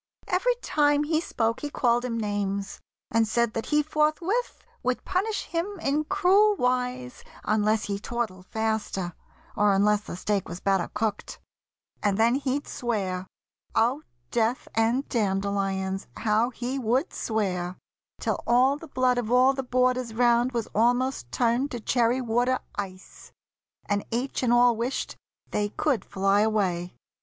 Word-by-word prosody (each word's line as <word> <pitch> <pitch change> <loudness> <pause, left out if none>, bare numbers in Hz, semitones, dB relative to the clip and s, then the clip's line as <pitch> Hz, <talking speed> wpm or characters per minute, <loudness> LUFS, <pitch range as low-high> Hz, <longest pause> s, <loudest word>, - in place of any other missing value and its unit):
Every 485 +7 +2
time 290 -1 +3
He 315 +1 +1
spoke 230 -8 -1
he 295 - -4
called 240 -3 +1
him 240 -2 -2
names, 200 -2 -2 0.3
and 225 0 +3
said 235 +1 +1
that 225 - -3
he 300 0 +3
Forthwith 310 +10 0 0.2
would 255 0 -1
punish 400 +4 -1
him 360 +3 -3
in 300 0 0
cruel 400 +3 +4
wise 250 -2 -1 0.2
Unless 215 +1 +2
he 200 -1 -3
tortled 210 -5 -4
faster, 220 -5 -2 0.4
or 205 -2 +4
unless 205 +1 +3
The 210 - -7
steak 200 +1 -1
was 175 - -6
better 195 -3 +1
cooked. 210 -1 -2 0.6
And 200 -1 +1
then 230 +2 +4
he'd 275 +1 -1
swear— 190 -6 -2 0.5
Oh, 245 +6 +2 0.3
death 235 +2 0
and 230 +5 +1
dandelions! 195 -2 -1
how 220 +2 +2
he 255 +2 -4
would 255 - 0
swear! 185 -5 -2 0.4
Till - - -1
all 255 +4 +4
the 325 - -11
blood 255 -3 +1
of 235 -1 -3
all 255 +2 +5
the 270 - -2
boarders 250 -2 0
round 240 +1 +3
Was 235 -3 -2
almost 245 - +1
turned 245 +4 +1
to 240 - -5
cherry 240 +2 +1
water 245 +2 +1 0.2
ice, 190 -2 -8 0.5
And 205 0 0
each 245 +4 -2
and 245 -2 +2
all 240 0 +5
wished 240 +4 -3 0.4
they 205 0 0
could 265 +2 0
fly 195 +1 +2
away. 190 -5 0
235 Hz, 150 wpm, -26 LUFS, 205-260 Hz, 0.6 s, all